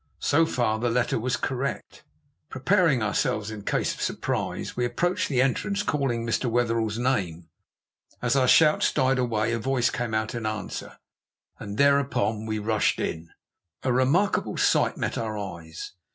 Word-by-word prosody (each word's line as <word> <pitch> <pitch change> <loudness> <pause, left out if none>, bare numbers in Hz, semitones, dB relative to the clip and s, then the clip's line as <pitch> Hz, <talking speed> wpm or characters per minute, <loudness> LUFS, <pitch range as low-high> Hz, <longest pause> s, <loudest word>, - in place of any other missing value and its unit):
So 160 +3 +2
far 110 -6 0
the 120 +1 0
letter 120 0 +1
was 125 +2 -1
correct. 135 +1 -4 0.5
Preparing 150 - +2
ourselves, 105 0 -1
in 110 -1 -7
case - - 0
of - - -10
surprise, - - -3
we 125 - -1
approached 170 +10 0
the 130 -3 +3
entrance, 200 +10 -1
calling 135 - -1
Mr. 115 +2 0
Wetherell's 115 -2 0
name. 95 -10 -1 0.7
As 125 +1 +1
our 130 -2 +3
shouts 155 +3 +5
died 130 0 +2
away 115 -2 0
a 115 - -1
voice 130 +1 +1
came 120 -3 -2
out 110 0 -1
in 115 -2 -3
answer, 110 -2 -5 0.6
and 100 0 -6
thereupon 135 -6 +2
we 110 0 -1
rushed 110 0 +1
in. 80 +1 -3 0.5
A 130 - +1
remarkable 140 +11 +1
sight - - +2
met - - -2
our 110 -2 -3
eyes. 85 -5 -7
120 Hz, 155 wpm, -26 LUFS, 110-135 Hz, 0.7 s, shouts